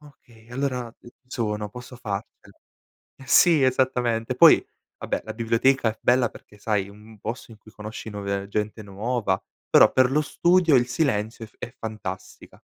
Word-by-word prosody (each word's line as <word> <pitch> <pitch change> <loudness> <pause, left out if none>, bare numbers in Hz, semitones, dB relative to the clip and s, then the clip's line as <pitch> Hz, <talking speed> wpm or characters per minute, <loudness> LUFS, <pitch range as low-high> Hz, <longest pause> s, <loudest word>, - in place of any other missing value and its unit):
"okay, 120 -6 -20
allora 125 -2 -3
ci 120 - -14 0.2
sono, 105 -4 -3
posso 125 +3 -10
farcela". 105 -4 -7 0.7
Sì, 165 +1 +5
esattamente. 125 -3 +1
Poi, - - +7 0.3
vabbè, - - -3
la 110 - -6
biblioteca 115 +2 +2
è 110 - -16
bella 125 -1 +3
perché, 105 - -16
sai, 100 -2 -1
un 105 +1 -16
posto 115 +3 -6
in 110 - -13
cui - - -17
conosci 110 +1 -8
nuove 100 -1 -4
gente 105 +1 -3
nuova, 100 0 -2 0.3
però - - +7
per 130 -1 +4
lo 150 - +3
studio 170 +1 +2
il 120 -1 +3
silenzio 115 -6 -1
è - - -16
f - - -29
è 120 - -8
fantastica. 110 -4 -8
115 Hz, 160 wpm, -24 LUFS, 105-125 Hz, 0.7 s, Poi